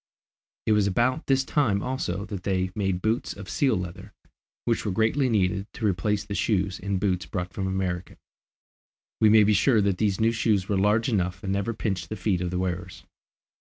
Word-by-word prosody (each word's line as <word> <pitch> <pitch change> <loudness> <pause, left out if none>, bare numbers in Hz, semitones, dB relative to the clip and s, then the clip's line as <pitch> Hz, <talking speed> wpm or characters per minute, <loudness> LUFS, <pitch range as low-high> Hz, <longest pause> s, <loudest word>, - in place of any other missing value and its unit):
It - - +2
was 105 -2 +3
about 120 +9 +1
this 135 -1 +3
time 110 -11 +1
also 100 -7 -2
that 100 -4 -6
they 95 -1 -1
made 95 -3 -1
boots 110 +2 0
of 100 -1 -10
seal 130 +9 +1
leather, 90 -1 -7 0.5
which 115 - 0
were 105 - -1
greatly 110 +7 +2
needed 100 -2 +1
to 110 - -4
replace 100 +1 0
the 100 - -5
shoes 100 -2 0
and 100 -1 -1
boots 95 -1 -1
brought 90 -2 -4
from 95 0 -2
America. 95 -2 -3 1.0
We 110 - +5
may 110 0 +7
be 105 +1 +4
sure 110 +4 +4
that 100 -2 0
these 100 -3 +1
new 110 +1 +3
shoes 105 -4 +1
were 100 - 0
large 105 +4 +2
enough 90 -6 -1
and 95 -1 -1
never 100 +3 -1
pinched 95 -6 -3
the 110 - -3
feet 95 -5 0
of 90 - -1
the 90 - -3
wearers. 90 -1 -4
100 Hz, 195 wpm, -26 LUFS, 95-110 Hz, 1.0 s, may